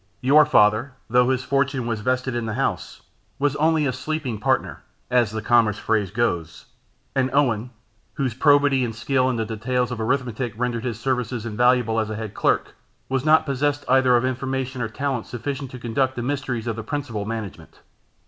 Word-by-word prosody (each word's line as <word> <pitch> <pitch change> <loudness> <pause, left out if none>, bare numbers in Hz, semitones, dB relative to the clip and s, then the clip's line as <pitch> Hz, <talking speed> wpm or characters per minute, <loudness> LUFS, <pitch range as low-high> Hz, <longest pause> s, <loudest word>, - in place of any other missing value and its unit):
Your 145 +3 +5
father, 110 +1 +3 0.2
though 125 +1 +4
his 130 -1 0
fortune 140 -2 0
was 115 -2 -2
vested 130 +2 -1
in 120 -1 -2
the 110 - -3
house, 135 +2 -3 0.3
was 145 0 0
only 155 0 +2
a 130 - 0
sleeping 130 -4 -3
partner, - - 0 0.3
as 120 -3 +3
the 110 +1 -5
commercial 115 -4 +2
phrase 110 -4 +1
goes; 90 -7 -2 0.5
and 130 -1 +2
Owen, 125 -5 +1 0.5
whose 135 -6 -1
probity 140 0 +4
and 115 -2 -3
skill 130 +2 +1
in 130 - -1
the 115 -1 -1
details 125 +3 -1
of 115 -2 -4
arithmetic 125 -1 -1
rendered 120 0 -2
his 115 -4 -3
services 125 -2 -2
invaluable 120 0 +2
as 110 -1 -1
a 110 - -4
head 110 -1 -6
clerk, - - 0 0.4
was 130 -1 0
not 155 +1 +4
possessed 145 +1 -1
either 130 -1 +4
of 120 - 0
information 130 0 -3
or 110 - -2
talents 130 0 -3
sufficient 135 +3 -4
to 130 - -9
conduct 130 +2 -1
the 120 - -3
mysteries 130 -4 -2
of 115 -2 -2
the 115 - -6
principal 115 -5 -4
management. 110 -3 -7
125 Hz, 185 wpm, -23 LUFS, 115-135 Hz, 0.5 s, Your